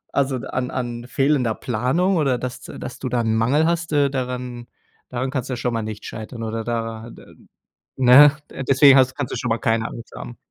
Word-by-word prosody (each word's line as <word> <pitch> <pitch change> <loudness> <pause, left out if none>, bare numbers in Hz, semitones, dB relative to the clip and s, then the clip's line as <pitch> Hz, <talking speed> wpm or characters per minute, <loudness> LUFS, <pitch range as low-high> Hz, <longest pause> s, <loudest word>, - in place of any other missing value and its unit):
Also, 135 -1 +1
d 130 - -7
an 125 0 -3
an 120 -2 -4
fehlender 135 -4 +1
Planung 145 - 0
oder, 135 -5 +1
dass 125 +1 -6
d - - -10
dass - - -7
du 130 - -4
da 125 0 0
'n 110 -1 0
Mangel 130 +8 +2
hast, 170 0 -1
äh, 145 -1 +3
daran 125 -2 -5 0.4
daran 130 +1 -3
kann's 130 -2 -3
schon 120 0 -1
mal 115 - -1
nicht 110 -1 -7
scheitern 115 +1 -7
oder 115 0 -3
da 115 -1 -4
da - - -14 0.7
ne? 130 +3 +8 0.4
Deswegen 135 0 +7
hast 130 0 +3
kannst 145 -4 -4
du - - -2
schon 120 - -3
mal 115 - +1
keine 115 -2 0
Angst 115 - -10
haben. 120 - -8
125 Hz, 205 wpm, -22 LUFS, 115-135 Hz, 0.7 s, ne